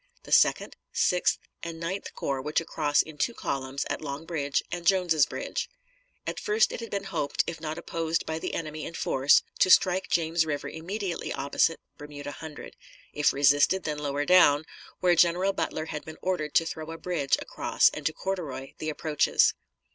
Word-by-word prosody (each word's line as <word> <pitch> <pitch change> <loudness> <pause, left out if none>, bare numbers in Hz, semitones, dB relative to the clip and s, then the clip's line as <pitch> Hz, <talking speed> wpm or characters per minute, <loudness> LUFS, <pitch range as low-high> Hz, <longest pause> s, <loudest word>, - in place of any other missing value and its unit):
The - - -12
Second, - - +3
Sixth, 180 0 +2 0.2
and 165 -1 -6
Ninth 185 +4 -4
Corps 135 -1 -2
were 150 +3 -5
to 165 - +1
cross 150 -3 +2
in 155 -2 -12
two 235 - 0
columns 135 0 -3
at - - -3
Long 145 +1 -5
Bridge 145 -5 -1
and 175 -1 -4
Jones's 175 -6 +4
Bridge. - - -4 0.6
At - - -3
first 440 +3 +2
it - - -5
had 230 - -7
been 200 -1 -3
hoped, 165 -7 -1
if 165 -2 -6
not 155 -1 -4
opposed 165 0 -2
by 160 0 -3
the - - -4
enemy 155 -1 -5
in 165 - -6
force, 135 -1 +3 0.2
to - - +4
strike 185 0 +4
James 165 0 +2
River 150 -2 -3
immediately 180 +3 -4
opposite 140 +4 +1 0.2
Bermuda 145 -1 -7
Hundred; 155 0 -9 0.4
if 150 0 +3
resisted, 145 +6 +4
then 150 -1 -3
lower 145 0 -2
down, 155 -4 +5 0.4
where 180 -1 +4
General 175 +3 +3
Butler 155 - -2
had 150 -2 -5
been 160 0 -10
ordered 180 -5 -2
to 165 - +5
throw 160 -1 -6
a 165 - -6
bridge 165 -6 0
across - - +2
and - - -8
to - - 0
corduroy 155 -9 -4
the 155 - -3
approaches. 155 -1 +2
160 Hz, 185 wpm, -27 LUFS, 145-175 Hz, 0.6 s, down